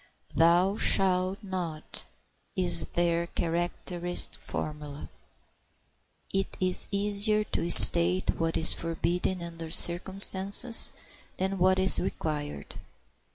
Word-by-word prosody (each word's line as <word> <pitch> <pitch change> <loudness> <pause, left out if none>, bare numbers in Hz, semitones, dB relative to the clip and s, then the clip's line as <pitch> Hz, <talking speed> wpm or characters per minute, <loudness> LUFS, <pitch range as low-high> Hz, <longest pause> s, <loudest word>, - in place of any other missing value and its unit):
"Thou 175 +5 -2
shalt 190 +1 -3
not," 175 -5 -10 0.5
is 175 -4 +1
their 170 0 -4
characteristic 175 +1 -7
formula. 150 -1 -10 1.2
It 195 0 -7
is 185 -1 +5
easier 205 +1 -1
to 175 -4 -7
state 175 +2 +8
what 165 0 -5
is 160 - 0
forbidden 170 +2 -7
under 165 -1 -12
certain 175 +3 0
circumstances 200 +5 +4 0.5
than 190 +1 -7
what 185 +1 -2
is 190 0 0
required. 150 - -10
175 Hz, 100 wpm, -23 LUFS, 165-190 Hz, 1.2 s, state